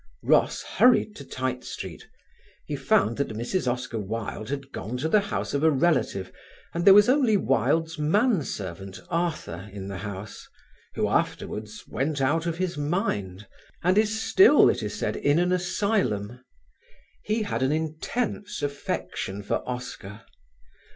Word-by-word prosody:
Ross - - +3
hurried 245 -4 +3
to 140 - -9
Tite 130 -1 -3
Street. - - -7 0.6
He - - -3
found 110 +3 +2
that 140 - 0
Mrs. 125 +3 0
Oscar 125 -2 -4
Wilde 110 +1 -5
had 140 -1 -5
gone 115 +5 -5
to 150 - -1
the 210 +6 +4
house 200 0 -3
of 140 - 0
a 160 - +6
relative 135 - +1 0.4
and 170 +1 -2
there 195 - +10
was 205 +1 +7
only 255 -5 +4
Wilde's 160 - +1
man 200 +6 +3
servant, 95 -5 -6
Arthur, 160 - -2
in 100 -1 -7
the 95 -1 -5
house, 100 0 -7 0.5
who - - +1
afterwards 110 0 -2
went 145 +2 -2
out 160 +5 +1
of 165 -1 -2
his 180 -4 -2
mind, 105 - -2 0.4
and 180 +2 +3
is 215 +1 +2
still, 380 - +6
it - - -4
is - - -4
said, - - -1
in 145 +2 +2
an 180 +1 +2
asylum. 175 - 0 0.8
He 215 +1 0
had 165 - -2
an 130 +1 +2
intense 160 +8 -3
affection 120 -7 -3
for - - 0
Oscar. 110 -4 -6
145 Hz, 150 wpm, -26 LUFS, -, 0.8 s, there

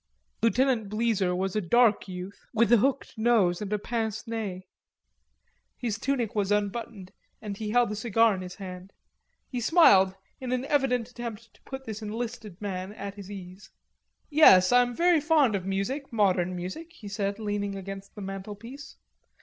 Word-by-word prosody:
Lieutenant 230 -2 +2
Bleezer 215 -4 +1
was 190 +1 -2
a 215 - +1
dark 225 +4 +3
youth 185 +1 -8
with 230 +1 +3
a 240 - +8
hooked 260 0 -1
nose 215 -6 +3
and 205 - -4
pincenez. 220 -2 -3 1.1
His 225 -3 -3
tunic 250 -5 -1
was 205 -2 0
unbuttoned 205 -1 -2 0.3
and 210 -2 -6
he 210 +1 -5
held 240 0 +3
a - - -3
cigar 225 0 +3
in 185 - -4
his 180 0 -8
hand. 185 -1 -9 0.5
He 250 -2 -4
smiled 200 - +5 0.2
in 255 -1 -5
an 255 +1 -1
evident 255 -5 +1
attempt 235 -2 -8
to - - -25
put 265 0 -7
this 220 -1 -6
enlisted 220 -2 -5
man 190 -1 -4
at 200 -1 -6
his 200 -1 -10
ease. 190 0 -10 0.6
"Yes, 190 -12 +7
I 245 0 +7
am 245 -1 -1
very 345 0 +4
fond 300 -6 +3
of 190 -1 -3
music, 245 +10 -2
modern 185 -5 +2
music," 190 - -6
he 225 -11 -11
said, 200 0 -2
leaning 205 -2 -2
against 195 0 -8
the 210 - -8
mantelpiece. 205 +8 -8
215 Hz, 165 wpm, -27 LUFS, 195-240 Hz, 1.1 s, a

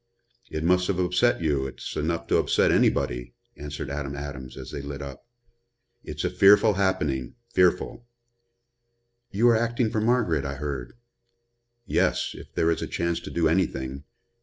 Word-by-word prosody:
"It 80 - -4
must 90 +2 +3
have 100 - 0
upset 90 +4 +2
you 70 -4 +1
it's 65 - -7
enough 85 +2 -1
to - - +2
upset - - +3
anybody," - - +1 0.2
answered 75 -1 -6
Adam 70 -1 -4
Adams, 70 -3 -7
as - - -8
they 70 - -5
lit 70 0 -6
up. 70 - -9 0.8
"It's 75 -1 -5
a - - 0
fearful 100 +3 +6
happening, 95 -10 -1 0.2
fearful." 90 +6 +1 1.2
"You 110 +4 +2
are 115 - +5
acting 115 0 0
for 110 - 0
Margaret, 110 - +2
I 70 0 -4
heard." 70 -3 -5 0.9
"Yes - - +1
if - - -12
there 80 - +2
is 85 - -1
a - - -3
chance 85 -1 -1
to - - -8
do 85 -1 +1
anything. 70 -6 -1
80 Hz, 160 wpm, -26 LUFS, 70-95 Hz, 1.2 s, fearful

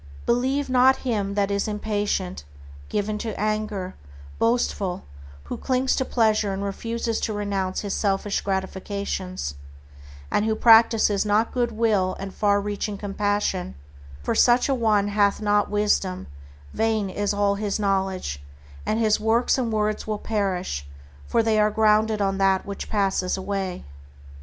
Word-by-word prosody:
Believe 265 +4 +1
not 260 +1 +5
him 205 -5 -1
that 200 -1 +1
is 200 +1 0
impatient, 205 - -2 0.5
given 210 +1 -2
to 220 -2 -5
anger, 215 -3 -2 0.5
boastful, 225 -5 0 0.4
who 70 - -6
clings 260 0 0
to - - 0
pleasure 215 -5 +1
and 195 +1 -3
refuses 230 +3 -2
to 220 - -2
renounce 200 -2 -2
his 200 -2 -3
selfish 200 0 0
gratifications, 190 - -3 0.8
and - - +2
who 220 0 +1
practices 225 -3 +5
not 215 +2 +1
good 240 -2 0
will 215 -4 +1
and 195 -1 -6
far 205 -1 +2
reaching 205 0 -3
compassion, 205 -2 -1 0.5
for - - 0
such 245 0 +4
a 275 - +1
one 215 -5 +2
hath 205 -1 +2
not 205 -1 +2
wisdom, 205 -3 0 0.5
vain 220 -2 0
is 205 +2 -1
all 205 -1 +2
his 205 0 -2
knowledge, 190 - -1 0.5
and 215 - +1
his 215 -2 +3
works 225 +3 +2
and 235 -3 -1
words 215 0 -1
will 215 -1 -1
perish, 185 - -2 0.4
for 230 - +2
they 220 -1 +2
are 210 0 +4
grounded 215 0 +2
on 195 0 -1
that 195 -1 +2
which 200 -1 -6
passes 195 -3 0
away. 190 - -4
205 Hz, 145 wpm, -24 LUFS, 195-220 Hz, 0.8 s, not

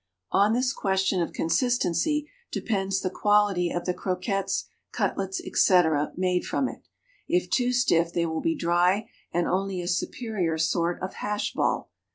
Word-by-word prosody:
On 205 +3 +4
this 255 +2 +1
question 190 -1 +1
of 170 - -2
consistency 250 - +1 0.2
depends 195 -3 -1
the 185 - -2
quality 205 -3 +2
of 175 0 -3
the 180 - 0
croquettes, 195 +1 -2 0.2
cutlets, 190 -1 -1
etc., 160 -5 +3
made 180 -1 +1
from 270 - 0
it. - - -10 0.4
If 180 0 0
too 250 -1 +2
stiff, 170 -9 +2
they 170 0 0
will 160 -1 -2
be 330 0 +1
dry 180 - +2 0.2
and 175 0 +1
only 190 0 -1
a 175 - -4
superior 185 -2 -1
sort 170 +2 0
of 185 - -4
hash 210 0 -2
ball. - - -1
190 Hz, 155 wpm, -26 LUFS, 175-210 Hz, 0.4 s, On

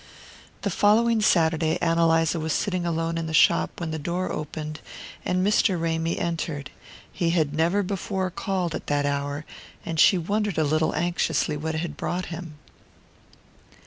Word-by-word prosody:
The 200 - 0
following 220 +4 +3
Saturday 160 -4 +3
Ann 165 -1 +1
Eliza 165 0 +3
was 160 -1 -1
sitting 185 -3 -1
alone 165 0 -1
in 165 - -3
the 160 - -2
shop 170 +2 +3
when 165 -2 -3
the 160 - -3
door 175 +5 -2
opened 155 0 -5 0.4
and 185 +1 0
Mr. 200 -3 +3
Ramy 165 0 -1
entered. 160 -4 -3 0.4
He 170 - 0
had 160 -4 +1
never 170 +6 +2
before 190 0 -2
called 185 -2 -2
at - - -6
that 145 -1 +1
hour, 145 +1 -2 0.4
and 165 -1 -3
she 190 - +6
wondered 205 +2 -1
a 160 - +3
little 155 +2 +1
anxiously 165 -3 0
what 160 +2 -3
had 160 -2 -4
brought 180 +1 -2
him. 165 -2 -8
165 Hz, 160 wpm, -25 LUFS, 160-180 Hz, 0.4 s, she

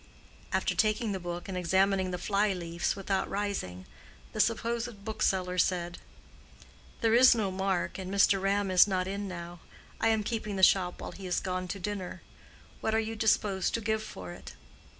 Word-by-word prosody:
After - - +1
taking 215 +1 +1
the 190 - -2
book 175 0 -5
and 190 - -5
examining 190 +1 +2
the 180 - -3
fly 200 +3 +1
leaves 170 -1 -2
without 195 -1 -1
rising, 190 - -3 0.5
the 215 - -5
supposed 230 -1 0
bookseller 185 -4 0
said, 175 -1 0 1.0
"There 225 -1 +3
is 250 +1 +7
no 205 -4 0
mark, 190 -1 -1
and 185 0 -5
Mr. 195 -1 +4
Ram 195 0 +1
is 185 +2 +7
not 185 -2 0
in 200 +1 -3
now. 175 -1 -7 0.4
I - - +2
am 220 -1 +2
keeping 215 -2 -3
the 190 - -2
shop 180 -2 +4
while - - -5
he 185 +2 -8
is 180 - +1
gone 185 -1 -3
to 195 +2 -5
dinner. 195 -1 -5 0.6
What 220 - 0
are - - +3
you 225 0 -3
disposed 205 -3 +1
to - - -1
give 220 0 0
for 90 - -8
it?" 65 - -10
195 Hz, 180 wpm, -30 LUFS, 180-215 Hz, 1.0 s, is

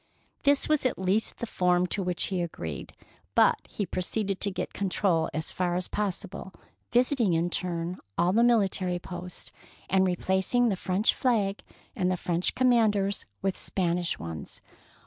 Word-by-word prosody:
This 285 0 +3
was 305 -2 +2
at - - -3
least 190 +4 0
the - - -3
form 180 -4 +2
to 195 +3 -2
which 180 -2 -1
he 185 -2 -1
agreed; 85 - -5 0.4
but - - +5
he 205 - -3
proceeded 195 +2 -2
to 205 - +2
get 185 - -4
con 200 -1 -2
trol 175 -4 +1
as 155 +2 -2
far 180 -1 -1
as 180 0 -2
possible, 200 -1 -4 0.4
visiting 245 - +3
in 170 +2 0
turn 175 0 -2 0.2
all 175 +2 +3
the 230 +3 +4
military 195 -6 +2
posts, 180 0 -7 0.4
and 190 0 +4
replacing 190 +7 +2
the 200 - +1
French 185 +3 +2
flag 210 -6 +1 0.3
and 185 -1 +1
the 185 - 0
French 175 +1 0
command 235 -4 +4
ers 200 0 -1 0.2
with 195 -1 +1
Spanish 175 -2 -1
ones. 80 -3 -7
190 Hz, 165 wpm, -28 LUFS, 175-210 Hz, 0.4 s, but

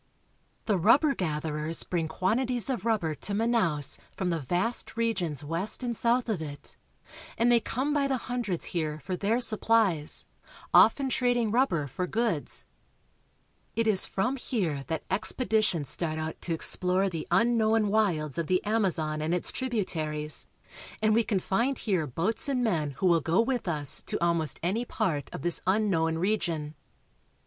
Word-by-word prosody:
The 205 -4 +1
rubber 275 - +4
gatherers 155 - -2
bring 170 -3 -2
quantities 240 +10 0
of 230 -5 -3
rubber 195 -9 +1
to 185 +7 -4
Manaos 205 - +1
from 185 -2 -2
the 165 - -1
vast 180 - 0
regions 185 - 0
west 170 - 0
and 240 -1 -2
south 240 +2 +1
of 210 -8 -2
it, 145 -2 -7 0.6
and 235 +1 +3
they 240 - +5
come 260 +6 -2
by 285 -2 +1
the 270 -1 0
hundreds 235 -8 -3
here 155 -3 -2
for 185 - -3
their 210 +6 0
supplies, 215 -8 +2 0.5
often 280 - +6
Wharves, - - -1
Manaos. - - +1
trading 245 -3 +1
rubber 225 - +1
for 180 +7 -4
goods. 220 -7 -1 1.1
It 230 - +1
is 210 -4 +4
from 250 +8 -1
here 175 - -2
that 160 -1 -3
expeditions 210 - +2
start 160 0 -1
out 160 0 -5
to 170 - -2
explore 185 +4 +1
the 165 -4 -5
unknown 220 +2 +3
wilds 170 -8 0
of 165 - -2
the 185 +2 +1
Amazon 175 -8 0
and 160 +3 0
its 180 - +2
tributaries, 160 - -2 0.5
and 215 0 +2
we 230 +2 +3
can 215 -3 0
find 235 +9 0
here 185 -8 -1
boats 190 - -1
and 255 -3 0
men 165 -10 0
who - - -2
will 170 -2 +4
go 165 +6 +1
with 240 -2 0
us 150 -4 -1
to - - -1
almost 170 -2 0
any 200 +7 0
part 150 - -2
of - - -7
this 175 -1 +2
unknown 185 -5 +1
region. 170 -5 -1
190 Hz, 165 wpm, -28 LUFS, 160-230 Hz, 1.1 s, often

